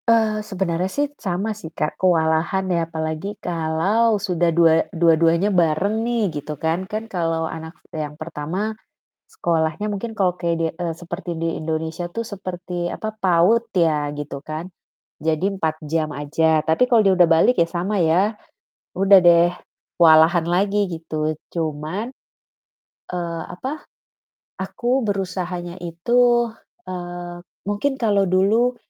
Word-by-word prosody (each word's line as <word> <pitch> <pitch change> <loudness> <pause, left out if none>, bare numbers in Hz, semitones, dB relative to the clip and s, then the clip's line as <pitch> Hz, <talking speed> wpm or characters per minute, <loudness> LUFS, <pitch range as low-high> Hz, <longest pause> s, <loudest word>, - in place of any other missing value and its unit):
Eee, 220 -2 +3
sebenarnya 190 -3 -2
sih 290 +7 0
sama 195 +3 -2
sih 205 -6 -9
Kak, 150 - -1
kewalahan 170 +1 +2
ya 170 -1 0
apalagi 160 +4 -4
kalau 180 +7 +1
sudah 180 -4 0
dua 165 -1 +4
dua-duanya 170 +2 +3
bareng 180 +5 +2
nih 220 -10 -1
gitu 150 +1 -6
kan. 165 +6 -2
Kan 215 +1 -3
kalau 165 -5 -1
anak 160 +1 -7 0.2
yang 150 -1 -5
pertama, 170 +7 -4 0.5
sekolahnya 170 - -1
mungkin 220 +3 -4
kalau 185 -4 0
kedie 165 -1 0
eee, 170 -2 -2
seperti 175 +1 -6
di 165 0 -2
Indonesia 160 +2 -3
tuh 230 - -1
seperti 180 -4 -5
apa, 220 - -4
PAUD 190 +5 +3
ya 160 -5 +2
gitu 145 -1 -6
kan, 155 +5 -6 0.5
jadi 160 +3 0
4 160 -2 -2
jam 155 0 -1
aja. 155 +2 +1
Tapi 160 +12 +2
kalau 235 -3 +4
dia 195 -2 +4
udah 175 - +7
balik 165 +9 +4
ya 170 - +4
sama 190 +4 -1
ya 185 +6 +2 0.6
udah 195 +1 +6
deh 170 0 +6 0.5
kewalahan 165 0 +6
lagi 200 +4 +1
gitu. 155 -2 -3 0.2
Cuman, 160 +7 -3 1.0
eee, 170 -2 -3
apa, 265 - -6 0.8
aku 240 +7 0
berusahanya 180 -3 -3
itu, 240 +7 +2 0.4
eee, 175 -1 -6 0.3
mungkin 265 +7 0
kalau 205 -4 +3
dulu 215 +7 +3
175 Hz, 135 wpm, -22 LUFS, 160-205 Hz, 1.0 s, udah